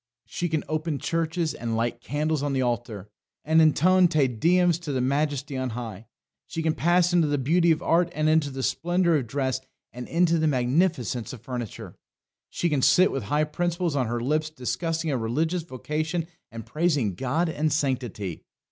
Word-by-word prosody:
"She 175 - -3
can 160 -2 -1
open 155 -1 -2
churches, 165 +3 -1
and 115 -1 -3
light 120 +1 -1
candles 150 +3 -1
on 145 -1 -1
the 130 -1 +1
altar, 120 -5 -3 0.4
and 160 +2 +4
intone 180 +4 +5
Te 155 -5 +2
Deums 170 +8 +2
to 165 -4 -5
the 130 - -1
Majesty 140 +1 -1
on 130 -1 -2
high. 110 -3 -7 0.4
She 165 - -4
can 160 -1 +2
pass 175 +2 +2
into 170 -3 +4
the 145 0 0
beauty 165 +6 +2
of 160 +1 +2
art, 170 +1 +2
into 155 -1 +2
the 135 -1 -5
splendour 170 +5 +1
of 130 -5 -3
dress, 130 +1 -1 0.3
and 125 0 -7
into 170 0 +2
the 160 - +2
magnificence 130 - 0
of 120 - -10
furniture. 120 -4 -6 0.5
She 175 - -1
can 150 -5 +1
sit 185 +8 +5
with 135 - -3
high 150 +1 +1
principles 170 +1 -1
on 130 -4 +1
her 120 +1 -2
lips 155 +5 0
discussing 160 +3 -2
a 135 - 0
religious 160 +10 -1
vocation 155 +3 -3 0.3
and 115 -2 -8
praising 150 - 0
God 135 - -1
and 155 -1 -1
sanctity. 125 - -2
150 Hz, 180 wpm, -25 LUFS, 130-165 Hz, 0.5 s, intone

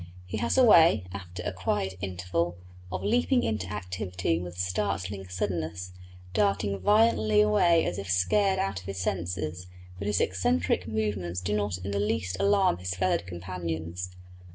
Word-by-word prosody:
He 95 +4 -4
has 115 - 0
a 260 - +7
way, 165 - +6
after 90 -2 -7
a - - -3
quiet 95 +1 -1
interval, 90 -2 -2 0.3
of 95 - -3
leaping 245 +3 +2
into 105 -5 -1
activity 90 -3 -2
with 90 0 -7
startling 95 +1 -2
suddenness, 90 -1 -3 0.4
darting 100 -1 +1
violently 205 - +4
away 135 +12 +4
as 90 - -2
if 100 -1 -6
scared 190 - +3
out 95 0 -1
of 90 - -13
his 100 -1 -5
senses; 90 -2 -3 0.3
but 100 - -3
his 105 -2 +1
eccentric 90 0 +1
movements 105 -5 -2
do 90 +3 -1
not 100 -3 -1
in 95 +2 -5
the 100 - 0
least 105 -3 -1
alarm 200 - +3
his 90 +1 -3
feathered 90 -1 0
companions. 85 -1 -5
95 Hz, 155 wpm, -28 LUFS, 90-105 Hz, 0.4 s, a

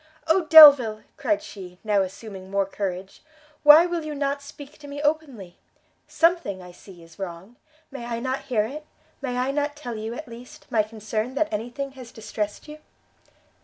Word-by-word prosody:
"Oh 330 +2 +2
Delvile!" 285 -9 +8
cried 205 - -1
she, 180 -3 -11
now 210 -2 +2
assuming 190 0 -7
more 200 0 0
courage, 190 -1 -6 0.4
"why 300 +3 +8
will 345 -2 -3
you 305 -1 -6
not 280 0 -2
speak 285 0 -13
to 290 - -12
me 285 0 -7
openly? 290 - -3 0.5
something, 330 - +1
I 180 -1 -12
see, 175 -1 -15
is 165 +1 -19
wrong; 190 +4 -8 0.4
may 265 -3 -7
I 230 -1 -3
not 260 +2 -4
hear 225 -5 +1
it? 300 +6 -8 0.3
may 250 -3 -3
I 255 +2 0
not 290 +1 -2
tell 295 -5 -7
you, 220 +2 -5
at 305 - -8
least, 240 +1 -13
my 220 - +3
concern 220 +3 -4
that 310 -4 -1
any 220 +3 -3
thing 275 +2 -6
has 255 -3 -12
distressed 210 +1 -5
you?" 300 0 -10
240 Hz, 180 wpm, -24 LUFS, 205-290 Hz, 0.5 s, Delvile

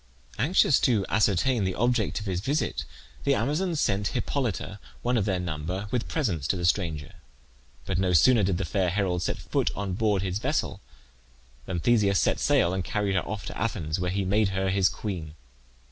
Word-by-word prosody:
Anxious 145 - +4
to 110 -7 +2
ascertain 105 +5 +2
the 95 -1 -1
object 120 -3 +1
of 105 - -7
his 95 -3 -1
visit, 140 +9 -1 0.4
the 140 0 +3
Amazons 155 +7 0
sent 100 -6 +1
Hippolyte, 105 - -2 0.2
one 125 +1 +1
of 110 -5 +1
their 95 -3 0
number, 90 +4 -4
with 120 -2 -1
presents 95 - -1
to - - +1
the 85 - -2
stranger; 80 -5 0 0.7
but 85 - -1
no 95 -1 +1
sooner 110 +8 +5
did 95 -2 +1
the 95 - -2
fair 90 +3 0
herald 90 -2 0
set - - -1
foot - - -1
on 100 -2 -3
board 105 -1 +1
his 95 +1 -2
vessel - - -1 0.9
than 90 -2 -2
Theseus 100 -2 +3
set - - +1
sail 85 - +3
and 95 -1 -1
carried 100 -1 -1
her 95 - 0
off 105 -1 -5
to - - -6
Athens, 85 -8 -2
where 90 0 -1
he 95 +1 -1
made 100 +2 +2
her 95 0 -1
his 95 -1 +3
queen. 85 -8 -5
100 Hz, 190 wpm, -27 LUFS, 90-110 Hz, 0.9 s, sooner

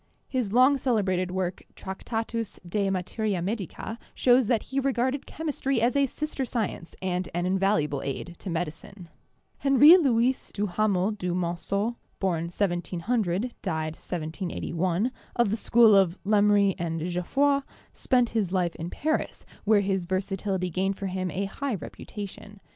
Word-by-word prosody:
His 250 -7 -1
long 260 +4 +5
celebrated 195 -8 +1
work, 185 -1 -2
'Tractatus 225 +2 -4
de 200 +2 0
Materia 195 +2 -1
Medica,' 205 +4 -4 0.2
shows 250 -2 +4
that 225 -2 +2
he 270 - -2
regarded 265 0 0
chemistry 280 -5 -2
as 235 +3 +2
a 280 -1 +3
sister 300 +1 -3
science 220 -8 -3
and 180 -1 -1
an 175 0 0
invaluable 185 -7 +1
aid 155 +5 -5
to 195 - -6
medicine. 170 +2 -5 0.5
Henri 285 +5 +8
Louis 255 -5 +1
Duhamel 205 0 +1
du 180 -4 -3
Monceau 195 +6 -1 0.2
(born 170 -4 0
1700, 185 +4 -1
died 155 -1 -2
1781), 175 +5 -2 0.2
of 235 -4 +2
the - - +2
school 225 -1 +5
of 190 -3 +4
Lemery 205 -1 +4
and 165 -1 -2
Geoffroy, 275 +11 +2 0.3
spent 245 -3 +2
his 210 -6 -1
life 180 -3 +1
in 165 +2 -4
Paris, 310 - -2 0.2
where 210 -1 +5
his 190 -2 -1
versatility 190 0 -2
gained 195 +3 0
for 200 - -5
him 185 -1 -2
a 195 +3 -2
high 265 +5 -3
reputation. 205 +2 -8
200 Hz, 140 wpm, -27 LUFS, 180-235 Hz, 0.5 s, Henri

